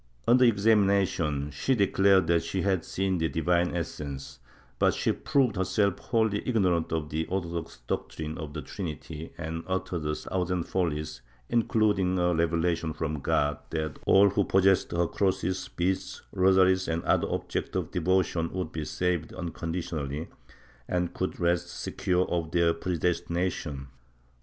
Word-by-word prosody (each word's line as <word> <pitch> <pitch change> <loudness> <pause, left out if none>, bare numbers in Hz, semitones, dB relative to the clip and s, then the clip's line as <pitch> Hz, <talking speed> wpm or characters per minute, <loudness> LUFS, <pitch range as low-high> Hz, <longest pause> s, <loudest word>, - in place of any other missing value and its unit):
Under 125 +2 +6
examination, 100 - +2
she 130 - 0
declared 100 -3 +4
that 85 0 +3
she 95 - -2
had 95 -4 +1
seen 95 -1 -1
the 80 0 +1
Divine 85 +1 +1
Essence, 70 -5 -5 0.4
but - - +3
she - - +1
proved 130 -7 +1
herself 100 +1 +1
wholly 110 -4 +1
ignorant 90 -9 +1
of 80 -2 -2
the 80 +2 -1
orthodox 85 -7 -4
doctrine 80 +5 -4
of 75 -2 -7
the 75 - -4
Trinity 80 -3 -6
and 80 0 -4
uttered 95 -3 -2
a 75 - 0
thousand 90 0 -2
follies, 75 -7 -2 0.3
including 105 -6 +2
a 90 0 +2
revelation 85 0 0
from 75 -1 -3
God 75 +1 +1
that 80 -2 -3
all 100 0 +6
who 100 +1 +2
possessed 95 0 +3
her 85 0 +1
crosses, 95 +1 -1
beads, 95 +2 -1
rosaries 95 0 +4
or 85 +1 -2
other - - +2
objects - - -3
of 90 -3 -2
devotion 90 -2 +1
would 90 -4 -3
be 80 -1 -4
saved 90 -2 -1
unconditionally 80 -4 -4 0.6
and 90 -1 -1
could 95 - -3
rest 85 0 +1
secure 90 -1 -1
of 85 -2 -1
their 85 -1 +3
predestination. 85 -3 -2
90 Hz, 140 wpm, -28 LUFS, 80-95 Hz, 0.6 s, Under